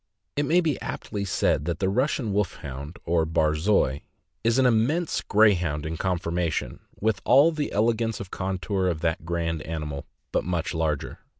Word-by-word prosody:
It 145 0 0
may 175 +4 +4
be 155 -6 -1
aptly 100 -2 -4
said 75 -5 +1
that 85 -1 -1
the 95 - 0
Russian 125 +1 0
Wolfhound, 75 -6 -3
or 85 -1 +2
Barzoi, 80 -2 +2 0.4
is 115 +2 +3
an 130 - +4
immense 125 +9 +2
Grey 105 0 +5
hound 80 -5 -2
in 80 +1 -3
conformation, 85 -2 -1 0.2
with 105 -2 0
all 140 +6 +6
the 155 -2 -3
elegance 115 +1 +1
of 95 -2 -7
contour 95 0 -1
of 80 -3 -1
that 80 -1 -1
grand 85 -2 -1
animal, 75 -3 -5 0.2
but - - +1
much 85 0 -2
larger. 80 -3 -2
90 Hz, 165 wpm, -26 LUFS, 80-110 Hz, 0.4 s, all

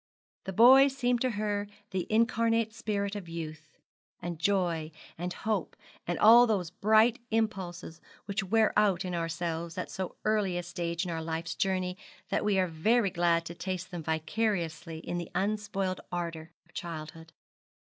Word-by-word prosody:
The 190 - -3
boy 260 +7 +8
seemed 250 -3 0
to 255 - +2
her 205 -2 -2 0.2
the 185 -3 -2
incarnate 230 0 +2
spirit 210 -3 -2
of 190 -5 -6
youth, 155 -2 -7 0.4
and 175 -2 -5
joy, 170 -4 0 0.2
and 175 +2 -4
hope, 215 -2 -2 0.3
and 175 -1 -1
all 235 +3 +8
those 185 -7 0
bright 220 +5 +4
impulses 190 -7 -2 0.2
which 200 +1 -1
wear 220 +3 +3
out 200 -3 +3
in 180 - -3
ourselves 165 0 -3
at - - -4
so 190 -2 -4
early 210 -4 +1
a 175 - -2
stage 170 0 -3
of 165 -2 -3
life's 165 0 -3
journey 185 -1 -1 0.3
that - - 0
we 210 -2 +2
are 185 - +3
very 195 +6 +2
glad 170 -1 +2
to 170 - -6
taste 185 0 -5
them 175 -2 -5
vicariously 165 0 -2
in 175 - -3
the 170 - -6
unspoiled 195 -2 -1
ardour 170 -2 -4 0.2
of - - -27
childhood. 160 -1 -7
185 Hz, 160 wpm, -30 LUFS, 170-215 Hz, 0.4 s, boy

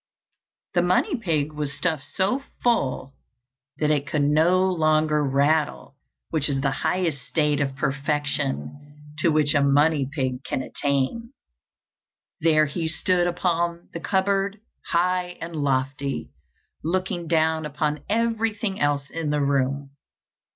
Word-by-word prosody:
The - - +3
money 395 - +2
pig 155 - -1
was 150 -2 -4
stuffed 160 -6 -1
so 200 +8 +1 0.2
full 135 - +1 0.6
that 150 -1 +1
it 145 -2 0
could 150 -2 0
no 165 +6 +4
longer 155 -2 +2
rattle, 145 +1 +1 0.4
which 155 -3 +2
is 135 -1 0
the 135 0 +1
highest 160 -1 -1
state 150 -2 +1
of 135 -1 -1
perfection 145 - -2 0.2
to 170 - +3
which 155 -1 +3
a 145 - +3
money 140 0 +3
pig 130 -3 -2
can 130 - -2
attain. 145 - -2 1.1
There 155 -1 +4
he 160 +3 -3
stood 175 +2 +1
upon 170 -1 -1
the 170 - -4
cupboard, 195 +2 0 0.3
high 180 +1 0
and 165 0 -6
lofty, 135 -1 -1 0.5
looking 175 0 -1
down 160 -1 +2
upon 150 0 -2
everything 225 -2 0
else 145 -1 +1
in 165 -2 -3
the 150 0 +1
room. 140 0 0
155 Hz, 130 wpm, -24 LUFS, 140-175 Hz, 1.1 s, no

